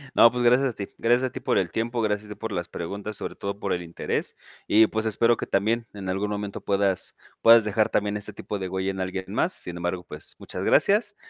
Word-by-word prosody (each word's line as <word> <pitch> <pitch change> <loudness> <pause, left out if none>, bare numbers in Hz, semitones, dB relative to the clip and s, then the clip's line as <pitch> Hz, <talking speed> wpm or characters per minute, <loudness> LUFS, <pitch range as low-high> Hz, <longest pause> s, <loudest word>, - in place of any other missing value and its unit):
No, 115 - +8
pues 125 0 -2
gracias 125 +3 +5
a - - -6
ti. 100 - -6
Gracias 120 +2 +2
a - - -26
ti 130 - -6
por 130 -1 0
el 90 -3 +1
tiempo. 115 +1 -1
Gracias 105 -1 -1
de 105 - -8
por 115 -1 -5
las 85 -2 -3
preguntas. 100 +5 -5
Sobre - - -5
todo, 100 0 -5
por 100 -2 -2
el 90 - -1
interés. 85 -1 -3 0.3
Y 110 +1 +6
pues, 110 +1 -2
espero 115 +2 +3
que - - -4
también 115 +4 +1
en 100 -2 -6
algún 100 +2 -1
momento 105 -1 -4
puedas 100 -1 0 0.2
puedas 115 -1 +7
dejar 105 +1 +2
también 105 0 0
este 105 0 -7
tipo 105 - -5
de 95 -1 -4
huella 95 +1 -1
en 95 -1 -5
alguien 95 0 -3
más. - - +1
Sin 90 - -4
embargo, 90 +1 -3
pues, - - -8
muchas - - -6
gracias. 205 +1 +3
105 Hz, 240 wpm, -25 LUFS, 95-115 Hz, 0.3 s, No